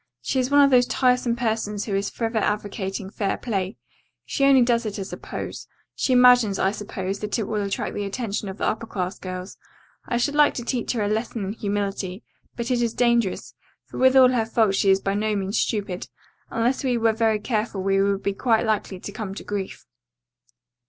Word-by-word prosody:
She 200 - 0
is 255 0 0
one 285 0 +6
of 275 - +4
those 245 -1 +5
tiresome 250 -2 +2
persons 220 -3 -2
who 205 - -4
is 200 +1 -1
forever 225 -1 -2
advocating 200 -2 -3
fair 200 -2 -1
play. 195 -4 -3 0.5
She 275 - -1
only 270 -2 +6
does 235 -1 +2
it 215 -2 -4
as 195 -1 -6
a - - -5
pose. - - -7 0.3
She - - -1
imagines, 245 -5 +6
I 190 - +2
suppose 200 -2 -4
that 210 +2 -2
it 225 - -1
will 210 +1 -2
attract 200 -1 -3
the 205 - -3
attention 205 -1 -3
of 190 - -7
the - - -2
upper 225 +1 -2
class 185 -3 -4
girls. 185 0 -7 0.5
I 240 - 0
should 285 +4 0
like 295 0 +4
to 240 - -5
teach 245 -1 -1
her 225 -3 -1
a - - 0
lesson 220 0 -2
in 195 - -3
humility, 200 -2 -3 0.3
but 235 +1 -3
it 245 -1 +2
is 230 -1 -1
dangerous, 235 -5 +1 0.3
for - - -8
with 260 0 +5
all 260 -1 +8
her 235 -3 0
faults 220 -4 +2
she 195 - +3
is 190 0 +5
by 195 0 -1
no 210 +1 0
means 195 +2 -1
stupid, 200 -4 -2 0.4
and 230 - -3
unless 250 +4 +1
we 250 -2 +1
were 225 -1 +2
very 220 -1 +1
careful 215 -3 -2
we 195 0 +2
would 200 0 0
be 200 - 0
quite 225 +3 +1
likely 210 -3 -1
to 205 - -7
come 200 -2 -6
to - - -7
grief." 200 -2 -5
215 Hz, 215 wpm, -24 LUFS, 195-240 Hz, 0.5 s, all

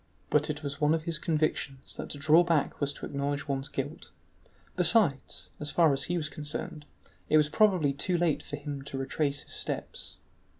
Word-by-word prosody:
But 150 0 +3
it 150 0 -3
was 140 +1 -5
one 150 +2 +4
of 160 - -3
his 165 -2 -1
convictions 150 -4 -1
that - - -6
to - - -5
draw 155 +4 +6
back 165 -5 0
was 140 0 +2
to - - -7
acknowledge 140 0 -2
one's 135 0 -2
guilt; 145 +4 -5 0.7
besides, 165 - +2
as 150 - -3
far 160 -3 +4
as 135 - 0
he 175 - -1
was 155 -3 -1
concerned, 150 0 -4 0.4
it 155 - +6
was 150 -1 +4
probably 175 -5 +3
too 175 +6 0
late 170 -3 +1
for - - -5
him 145 -1 -5
to 135 - -5
retrace 140 +2 -1
his - - -9
steps. - - -4
150 Hz, 195 wpm, -29 LUFS, 140-160 Hz, 0.7 s, draw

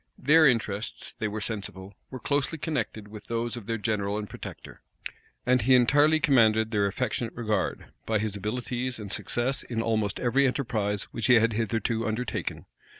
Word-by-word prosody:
Their 155 +3 +6
interests, 115 -4 -1
they 110 - -3
were 105 +1 -4
sensible, 100 -2 -5 0.2
were 130 - -6
closely 145 +5 -1
connected 140 -9 -3
with 105 0 -11
those 115 0 -2
of 115 -4 -9
their 115 -1 -1
general 105 -1 -1
and 105 -1 -4
protector. - - -10 0.6
And 125 0 +3
he 130 +4 +5
entirely 145 +5 +5
commanded 110 -8 +4
their 100 -2 +2
affectionate 115 +2 -2
regard, 110 -3 -1 0.2
by 110 - +2
his 105 -1 -2
abilities 120 +4 -3
and 105 -3 -7
success 125 +6 0
in 115 -2 -3
almost 110 -3 0
every 135 +3 +3
enterprise 110 -6 -1
which 115 - -1
he 125 - +7
had 115 0 +4
hitherto 115 +1 -1
undertaken. 110 +2 -3
115 Hz, 165 wpm, -27 LUFS, 105-125 Hz, 0.6 s, he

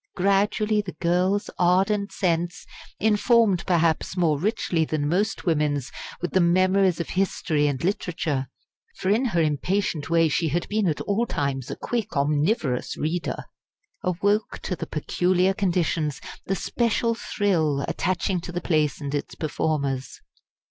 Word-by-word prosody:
Gradually 205 +3 +2
the 190 -3 -7
girl's 180 +4 +1
ardent 195 +3 +2
sense 175 -2 -1 0.3
informed, 220 -2 +3
perhaps, 170 0 +1
more 160 -5 +2
richly 180 - 0
than 155 -2 -1
most 195 +7 0
women's 150 -5 0 0.3
with 175 - -1
the 190 - +3
memories 185 +1 +3
of 170 - -3
history 170 -5 0
and 140 -1 -2
literature, 165 -7 -1 0.5
for 190 - -1
in 230 +6 +2
her 175 -9 +1
impatient 155 +1 -1
way 165 0 +4
she 160 +2 0
had 165 +3 -1
been 210 -2 +1
at 155 - -1
all 225 +4 0
times 135 - -2
a - - -4
quick, 235 -10 -3
omnivorous 145 - 0
reader 165 +3 -2 0.6
awoke 200 +4 0
to 180 - -2
the - - -6
peculiar 180 +4 +1
conditions, 170 -6 0 0.3
the 195 - +1
special 230 +3 0
thrill, 165 -11 0
attaching 185 0 -1
to 175 - -7
the 175 - -2
place 155 -4 +1
and 140 -1 -5
its 145 - -3
performers. 140 -4 -2
175 Hz, 140 wpm, -25 LUFS, 155-200 Hz, 0.6 s, way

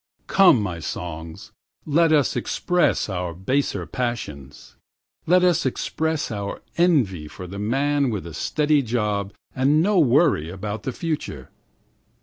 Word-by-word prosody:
1Come, 190 -11 +6
my 90 -5 -3
songs, 80 0 -7 0.3
let 160 +2 +3
us 150 -3 +3
express 180 -1 +1
our 90 -4 -4
baser 130 +11 -1
passions.2Let 120 - -3
us 175 -3 +3
express 155 +3 -2
our 100 -2 -5
envy 125 - +2
for 90 - -9
the 100 +3 -7
man 140 +5 +1
with 105 -6 -4
a 85 - -8
steady 150 - +1
job 105 -5 -1 0.2
and 140 +4 +3
no 200 0 +3
worry 135 - +3
about 105 +3 -5
the 130 - -3
future. 145 - -5
120 Hz, 130 wpm, -23 LUFS, 95-150 Hz, 0.3 s, 1Come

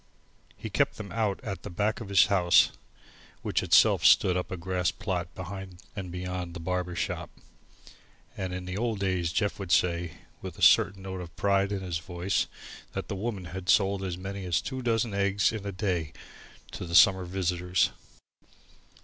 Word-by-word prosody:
He - - -7
kept - - +1
them 105 -2 -7
out 110 -4 0
at 100 -3 -5
the - - -7
back 105 +6 -1
of 110 - -7
his 100 -2 +6
house, 90 -4 +4 0.7
which - - 0
itself - - +5
stood 90 - +6
up 90 - -2
a 95 - -4
grass 90 0 -1
plot 90 -3 -3
behind 95 0 -7 0.2
and 95 -3 -5
beyond 90 -1 -5
the - - -5
barber 90 +1 -2
shop, - - -3 1.1
and 95 -2 -4
in 90 0 -5
the 90 0 -5
old 115 +1 -1
days 95 -3 0
Jeff 100 +3 -1
would 95 -3 -5
say, 85 -2 +2 0.3
with - - -7
a - - -4
certain 95 -1 +5
note 95 -1 -5
of 85 -1 -10
pride 100 0 +1
in 100 -2 -2
his 90 -3 -3
voice, 90 +3 -1 0.5
that - - -5
The - - -2
Woman 100 -2 -4
had 90 +1 -7
sold 100 -1 +3
as 90 -2 -3
many 95 +1 -6
as 85 -2 +1
two 130 -1 -5
dozen 115 -2 0
eggs 100 0 +2
in 105 -3 -5
a - - -2
day 90 -6 -2 0.6
to 90 - -6
the 85 - -3
summer 95 0 +6
visitors. 90 0 0
95 Hz, 185 wpm, -28 LUFS, 90-100 Hz, 1.1 s, his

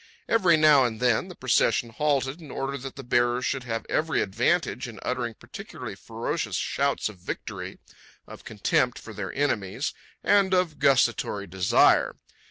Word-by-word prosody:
Every 185 -7 +4
now 150 -3 +6
and 115 -3 -2
then 125 +6 +2
the 180 - -10
procession 120 -2 +2
halted 140 +3 0
in 155 - -11
order 135 +2 -3
that 135 -1 -7
the 135 - -8
bearers 120 +1 +1
should 135 -2 -2
have 115 -1 -3
every 160 +1 0
advantage 125 - 0
in 115 - -10
uttering 120 -3 -2
particularly - - -9
ferocious - - -4
shouts 140 0 0
of 105 -4 -10
victory, - - -6 0.5
of - - -12
contempt 125 - 0
for 110 - -10
their 100 -3 -5
enemies, 125 - -1 0.3
and 195 -2 +4
of 180 -4 0
gustatory 120 -6 +2
desire. 95 -1 +3
130 Hz, 155 wpm, -26 LUFS, 115-150 Hz, 0.5 s, now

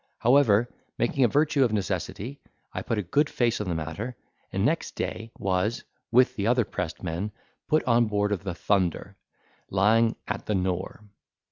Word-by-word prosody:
However, 120 -3 +4 0.3
making 130 +3 +1
a - - +6
virtue 145 +3 +3
of 120 - +2
necessity, 110 +5 -3 0.3
I - - -3
put 115 - -2
a 105 - 0
good 145 - +2
face 120 -2 +1
on 100 - -3
the 85 - -1
matter, 80 +10 -4 0.4
and - - 0
next - - 0
day, 110 0 -4
was, 95 +4 0 0.3
with 125 +1 +4
the 100 -2 -1
other 120 -1 +3
pressed 90 -2 -5
men, 90 +4 -3 0.4
put 155 0 +3
on 120 -1 +4
board 105 -1 0
of 100 -2 -1
the 95 -3 -4
"Thunder," 95 -3 0 0.5
lying 110 +4 +3
at - - -4
the 105 - +1
Nore. 95 +2 -2
105 Hz, 170 wpm, -27 LUFS, 95-120 Hz, 0.5 s, a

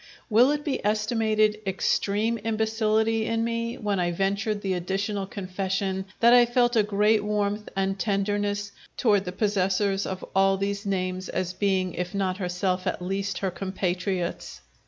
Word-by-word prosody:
Will 240 +5 +6
it 295 0 -1
be 285 -4 -2
estimated 215 0 +1
extreme 210 +4 0
imbecility 220 0 +1
in 225 0 0
me 230 +1 -2
when 205 -3 -1
I 175 -1 +1
ventured 200 +4 -1
the 190 -1 0
additional 195 +3 -2
confession 190 0 -3 0.2
that 235 +1 +7
I 245 0 +8
felt 240 0 +2
a 220 - +6
great 210 +1 +2
warmth 210 0 -1
and 195 0 -1
tenderness 205 0 -1 0.3
toward 205 -5 +3
the 180 - -3
possessors 195 0 0
of 190 0 -5
all 195 0 +4
these 200 +1 -2
names, 185 -1 -2
as 185 -1 -2
being, 185 -2 0
if 180 +2 -4
not 190 -2 0
herself, 180 0 -1
at - - -1
least 195 +2 -2
her 190 - 0
compatriots? 185 -1 -3
200 Hz, 155 wpm, -26 LUFS, 190-215 Hz, 0.3 s, I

